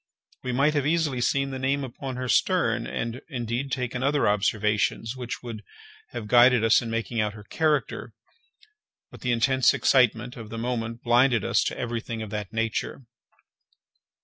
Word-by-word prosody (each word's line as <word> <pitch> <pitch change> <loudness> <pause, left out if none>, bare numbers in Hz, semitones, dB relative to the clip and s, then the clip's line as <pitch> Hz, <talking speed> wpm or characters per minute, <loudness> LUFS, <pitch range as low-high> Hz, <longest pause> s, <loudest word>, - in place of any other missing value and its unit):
We 125 - -3
might 140 +5 +2
have 145 -2 0
easily 150 -6 +1
seen 135 +2 +1
the 130 - -5
name 135 +2 0
upon 130 +1 -6
her 125 0 -4
stern, 120 - +2
and, 115 +2 -4
indeed, 125 0 -3
taken 125 -1 -2
other 140 +2 +2
observations, 105 +3 0
which 125 -2 -6
would 115 -3 -7 0.5
have 120 -3 -6
guided 120 +1 +5
us 115 0 +5
in 115 - -5
making 115 0 -1
out 105 -1 -2
her 105 - -11
character; 150 +5 -1 1.0
but - - -13
the 125 - 0
intense 130 +2 +3
excitement 125 -1 +2
of 110 -2 -9
the 115 - -6
moment 115 -1 -3
blinded 120 -1 +3
us - - +2
to - - -2
every 120 -1 -3
thing 115 -1 -5
of 105 - -8
that 105 -2 -4
nature. 115 +4 -2
120 Hz, 170 wpm, -26 LUFS, 115-130 Hz, 1.0 s, guided